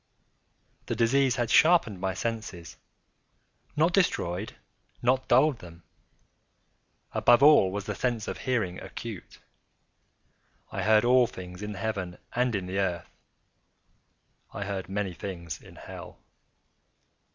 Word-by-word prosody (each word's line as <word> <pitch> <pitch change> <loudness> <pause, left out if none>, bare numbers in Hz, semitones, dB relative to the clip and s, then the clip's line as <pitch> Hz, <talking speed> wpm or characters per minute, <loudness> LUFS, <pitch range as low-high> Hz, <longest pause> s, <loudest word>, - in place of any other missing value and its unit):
The - - -2
disease 130 +2 +3
had 120 -2 -1
sharpened 155 - +4
my 95 -1 -1
senses—not 115 - -5
destroyed—not 125 - -1
dulled 130 +1 +4
them. 85 -1 -13 1.3
Above 120 +2 +4
all 145 -11 +7
was 100 0 -4
the - - -3
sense 120 -4 -2
of - - -5
hearing 110 -9 -1
acute. - - -8 1.3
I - - -3
heard 110 +1 +4
all 125 0 +5
things 90 -1 -10
in 105 0 -5
the - - -9
heaven 95 -4 -3 0.2
and 125 -1 +1
in 95 -2 -2
the 95 +2 -3
earth. 90 -3 -2 1.4
I 100 - -5
heard 95 -2 -5
many 100 -1 -2
things 85 -4 -7
in - - -15
hell. - - -10
105 Hz, 120 wpm, -28 LUFS, 95-125 Hz, 1.4 s, all